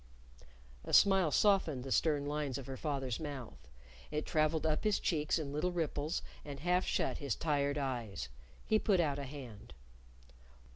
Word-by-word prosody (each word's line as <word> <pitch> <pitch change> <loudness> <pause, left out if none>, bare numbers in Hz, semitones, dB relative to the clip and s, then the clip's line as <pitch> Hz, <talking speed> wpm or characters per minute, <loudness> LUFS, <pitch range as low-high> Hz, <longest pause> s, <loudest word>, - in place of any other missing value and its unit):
A - - -7
smile 195 -4 +6
softened 165 -8 +3
the 135 - -6
stern 145 -1 +2
lines 145 -3 -2
of 135 - -7
her 135 - -5
father's 135 -4 -2
mouth. 130 - -7 0.4
It 150 0 -2
traveled 155 +1 +1
up 155 -1 +1
his 210 -1 +2
cheeks 155 -3 +1
in 145 -3 -4
little 155 +5 0
ripples, 160 -1 -2 0.2
and 140 -2 -7
half 180 +2 +2
shut - - 0
his 140 -7 -1
tired 145 -2 0
eyes. 120 - -3 0.4
He 215 - +3
put 200 -5 +2
out 145 -4 +1
a 140 - -4
hand. 125 - -10
150 Hz, 160 wpm, -34 LUFS, 135-160 Hz, 0.4 s, smile